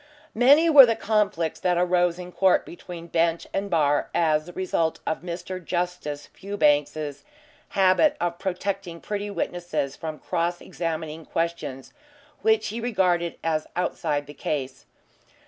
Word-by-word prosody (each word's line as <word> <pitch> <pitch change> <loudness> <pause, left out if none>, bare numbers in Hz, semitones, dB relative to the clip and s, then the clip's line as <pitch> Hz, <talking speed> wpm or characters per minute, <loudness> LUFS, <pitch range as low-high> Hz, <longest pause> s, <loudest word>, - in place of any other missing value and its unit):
Many 280 +8 +6
were 285 -6 +10
the 230 - +2
conflicts 205 -7 0
that 180 -1 +1
arose 175 -1 +2
in 180 0 -8
court 190 0 +3
between 175 -1 -9
bench 165 0 +1
and 200 +1 -2
bar 145 -4 +2
as 155 -1 +2
the 175 - -9
result 170 -3 -1
of - - -1
Mr. 180 +1 -6
Justice 175 -4 -3
Fewbanks's 150 -6 0 0.5
habit 190 +10 +4
of 170 0 -2
protecting 190 -2 -3
pretty 205 +2 -4
witnesses 175 -8 -3
from 155 -1 -6
cross 175 +1 -2
examining 160 -1 -4
questions 165 -6 -3 0.5
which 220 -1 +2
he 230 +3 -4
regarded 180 -7 +1
as 155 -1 0
outside 145 -4 -1
the 145 - -11
case. 135 -2 -4
175 Hz, 135 wpm, -25 LUFS, 160-190 Hz, 0.5 s, were